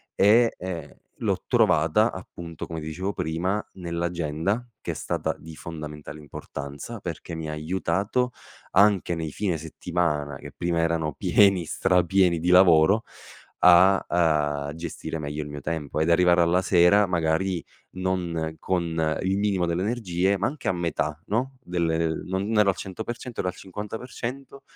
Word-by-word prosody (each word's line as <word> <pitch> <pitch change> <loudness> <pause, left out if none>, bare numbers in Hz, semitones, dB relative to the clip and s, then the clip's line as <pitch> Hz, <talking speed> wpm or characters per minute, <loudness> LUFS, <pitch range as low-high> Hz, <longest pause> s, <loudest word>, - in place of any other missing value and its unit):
e, 115 +4 +5
ehm, 90 -2 -6 0.2
l'ho - - -1
trovata 85 +9 +3
appunto 85 -3 -8
come 80 -1 -5
dicevo 90 +6 -3
prima, 90 +6 -1
nell'agenda 85 +4 -2
che - - -3
è - - -3
stata - - -2
di 80 0 -10
fondamentale 75 -2 -8
importanza, 70 - -7
perché 85 -1 -6
mi 80 -1 -5
ha - - -3
aiutato 95 +9 -1 0.4
anche 100 -3 +4
nei 80 -2 -4
fine 95 -6 -1
settimana, 75 -2 -2
che - - -10
prima 85 -1 -1
erano 80 -2 0
pieni, 95 +5 +4
strapieni 90 +1 +2
di 85 +2 -1
lavoro, 90 +3 +6 0.6
a, 90 +2 +6 0.7
uhm, - - -8
gestire 80 0 -5
meglio 75 0 -4
il 75 - -6
mio 75 0 -6
tempo 75 -1 -3
ed 80 +2 +2
arrivare 90 0 +5
alla 85 +2 +3
sera 95 +3 +5
magari 85 +1 0 0.3
non 90 -4 -2
con 80 -3 0
il 95 +1 +1
minimo 100 -4 +1
delle 85 +2 -1
energie 100 -3 0
ma 100 - +1
anche 140 +4 -4
a - - +3
metà, 80 -3 -2
no, 130 +5 -1
delle, 85 -2 0
ehm 80 -1 -2
non 100 +4 -1
ero 105 -1 +5
al - - -3
100%, 115 +5 -6
ero 90 - -1
al - - -15
50%, 120 +7 -7
90 Hz, 150 wpm, -25 LUFS, 80-95 Hz, 0.7 s, lavoro